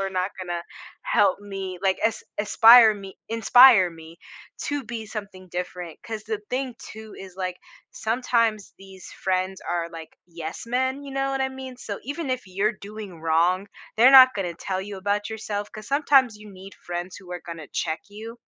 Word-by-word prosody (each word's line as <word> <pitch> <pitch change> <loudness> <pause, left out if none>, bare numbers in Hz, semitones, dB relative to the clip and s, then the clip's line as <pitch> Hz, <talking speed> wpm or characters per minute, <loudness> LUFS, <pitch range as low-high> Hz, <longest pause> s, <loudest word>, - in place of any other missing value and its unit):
are 195 0 -2
not 185 +1 -1
gonna 175 -2 -4 0.4
help - - +2
me, 195 -3 -6
like, 190 -1 +2
is 225 - -3 0.2
ispire 225 +1 +7
me 195 -1 -10
inspire 230 -3 +7
me 165 0 -13 0.5
to 290 -3 -2
be 225 -1 -6
something 200 -4 -8
different, 180 -2 -6
'cause 220 -2 -6
the 220 -1 -3
thing, 255 -1 -2
too, 220 0 -11
is, 190 -2 -10
like, 185 -1 -3 0.4
sometimes 230 -2 0
these 190 -1 -13
friends 185 0 -2
are 170 -1 -2
like, 165 -1 -11
yes 165 +4 -7
men, 260 +3 -1
you 280 - -9
know 275 0 -1
what 270 0 -2
I 265 - +1
mean? 265 -1 -9
So 205 -5 -6
even 290 +3 -4
if 255 -1 -1
you're 195 +4 0
doing 205 -4 -9
wrong, 175 +5 +1 0.3
they're 245 +4 +7
not 260 -1 +9
gonna 185 -4 -2
tell 190 +2 -4
you 200 -1 -7
about 205 +2 -1
yourself, 210 -2 -5
'cause 215 -1 -10
sometimes 275 -5 +3
you 210 0 -13
need 190 +1 -12
friends 175 +1 -6
who 180 -2 -11
are 175 - -5
gonna 165 -4 -9
check 160 -1 -2
you 225 +3 -9
205 Hz, 180 wpm, -24 LUFS, 185-235 Hz, 0.5 s, not